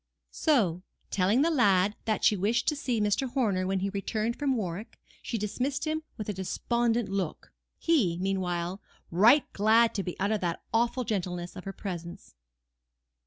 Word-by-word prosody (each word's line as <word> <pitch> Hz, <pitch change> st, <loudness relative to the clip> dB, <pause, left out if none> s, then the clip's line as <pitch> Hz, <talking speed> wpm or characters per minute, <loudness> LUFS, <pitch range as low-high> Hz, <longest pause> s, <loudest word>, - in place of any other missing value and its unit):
So, 205 Hz, -, +2 dB, 0.3 s
telling 200 Hz, +8 st, +3 dB
the 335 Hz, -, +2 dB
lad 205 Hz, -, +3 dB
that 215 Hz, -1 st, 0 dB
she 210 Hz, -, +5 dB
wished 215 Hz, +6 st, 0 dB
to 300 Hz, -, -1 dB
see 250 Hz, -5 st, -1 dB
Mr. 210 Hz, +6 st, +1 dB
Horner 205 Hz, -8 st, 0 dB
when 190 Hz, 0 st, 0 dB
he 195 Hz, +1 st, -1 dB
returned 215 Hz, +3 st, -2 dB
from 275 Hz, -3 st, 0 dB
Warwick, 195 Hz, +1 st, -5 dB, 0.2 s
she 235 Hz, -, -3 dB
dismissed 255 Hz, +8 st, -2 dB
him 315 Hz, 0 st, -1 dB, 0.2 s
with 215 Hz, -, -5 dB
a 210 Hz, -, -1 dB
despondent 235 Hz, +4 st, 0 dB
look; 190 Hz, -4 st, -4 dB, 0.2 s
he, 235 Hz, -, +2 dB
meanwhile, 185 Hz, 0 st, -2 dB, 0.3 s
right 230 Hz, -, +6 dB
glad 220 Hz, +3 st, +4 dB
to 200 Hz, -, -1 dB
be 180 Hz, -2 st, -6 dB
out 200 Hz, +3 st, +1 dB
of 215 Hz, -, 0 dB
the 170 Hz, -2 st, -1 dB
awful 235 Hz, +2 st, +1 dB
gentleness 180 Hz, -5 st, -3 dB
of 180 Hz, -, -9 dB
her 195 Hz, -, -3 dB
presence. 170 Hz, -, -7 dB
210 Hz, 165 wpm, -28 LUFS, 185-240 Hz, 0.3 s, right